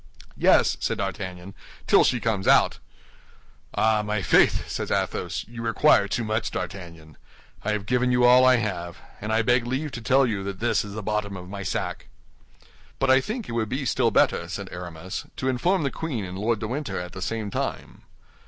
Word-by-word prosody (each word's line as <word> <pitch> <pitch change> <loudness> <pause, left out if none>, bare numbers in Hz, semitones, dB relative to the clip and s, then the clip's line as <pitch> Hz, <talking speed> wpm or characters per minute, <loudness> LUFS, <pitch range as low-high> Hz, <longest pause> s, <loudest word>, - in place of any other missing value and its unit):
"Yes," - - +4
said - - -1
D'Artagnan, 95 -1 -5 0.3
"till - - +5
she 125 - +2
comes 105 -3 -1
out." - - +4 1.0
"Ah, 110 -1 +3
my 105 -1 -2
faith!" - - +3
said - - -4
Athos, - - -2
"you 120 +1 -8
require 115 -1 +4
too 110 +4 -2
much, 110 0 -1
D'Artagnan. 85 -4 -7 0.5
I 105 - 0
have 105 -1 -3
given 125 +2 +1
you 125 0 +3
all 125 +1 +7
I 130 0 +6
have, 90 -7 -3 0.2
and 105 +1 -3
I 110 +1 +2
beg 120 +1 +2
leave 135 +4 -2
to 120 - -6
tell 135 +3 +4
you 105 -5 -2
that 100 -1 -5
this 120 +1 +1
is 105 -1 -8
the 110 - -5
bottom 105 -2 -2
of 90 0 -10
my 100 0 -6
sack." 95 - -3 0.9
"But 135 -1 +2
I 130 0 +6
think 220 - -5
it - - -6
would 115 -2 -1
be 135 +2 -2
still - - +2
better," 85 - +2
said 100 +1 -5
Aramis, 90 +1 -6
"to 130 - -2
inform 160 +8 +1
the 140 - -1
queen 130 -11 -4
and 90 0 -7
Lord 110 +4 0
de 110 +1 -4
Winter 125 -6 -3
at 90 0 -6
the 95 - -8
same 110 +1 -3
time." - - -4
110 Hz, 200 wpm, -25 LUFS, 95-125 Hz, 1.0 s, all